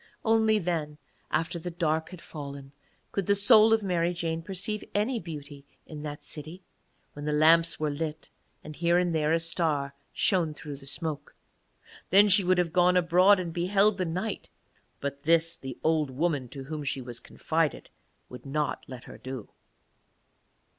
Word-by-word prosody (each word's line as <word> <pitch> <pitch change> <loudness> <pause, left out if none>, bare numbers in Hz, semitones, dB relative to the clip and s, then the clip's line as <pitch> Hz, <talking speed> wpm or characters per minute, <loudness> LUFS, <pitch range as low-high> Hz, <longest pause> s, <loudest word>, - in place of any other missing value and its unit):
Only 220 -1 +3
then, 165 -6 -2 0.3
after 165 +2 -1
the 175 - -5
dark 160 -2 -1
had 185 -3 -11
fallen, 140 -2 -8 0.4
could 195 -3 -2
the 200 - +4
soul 215 +2 +6
of 225 -1 +3
Mary 175 -2 0
Jane 165 -1 -2
perceive 200 +5 -3
any 225 +4 +1
beauty 145 -5 -9 0.2
in 155 -2 -9
that 150 -1 -7
city, 160 +5 -7 0.5
when 145 0 -8
the 150 - 0
lamps 165 +2 +4
were 155 -1 0
lit 155 +1 -5 0.3
and 155 0 -9
here 170 +2 +2
and 180 -1 +1
there 155 -1 +1
a 165 - +3
star 160 -4 -1 0.2
shone 165 -5 +1
through 145 -2 -8
the 135 0 -10
smoke. 150 0 -3 0.7
Then 200 +3 +6
she 195 +1 +7
would 185 0 +2
have 175 -2 0
gone 180 0 +4
abroad 180 +3 +5
and 170 -2 -4
beheld 195 +4 +2
the 185 - 0
night, 185 +6 -4 0.5
but 140 0 -4
this 165 +2 +2
the 130 -2 -8
old 155 -3 +2
woman 140 -2 -1
to 135 +1 -8
whom 150 +2 -6
she 135 -1 -2
was 120 -2 -7
confided 160 -2 -2 0.4
would 125 - -11
not 145 +1 -2
let 130 -2 -9
her - - -12
do. 130 -4 -7
165 Hz, 170 wpm, -28 LUFS, 150-180 Hz, 0.7 s, she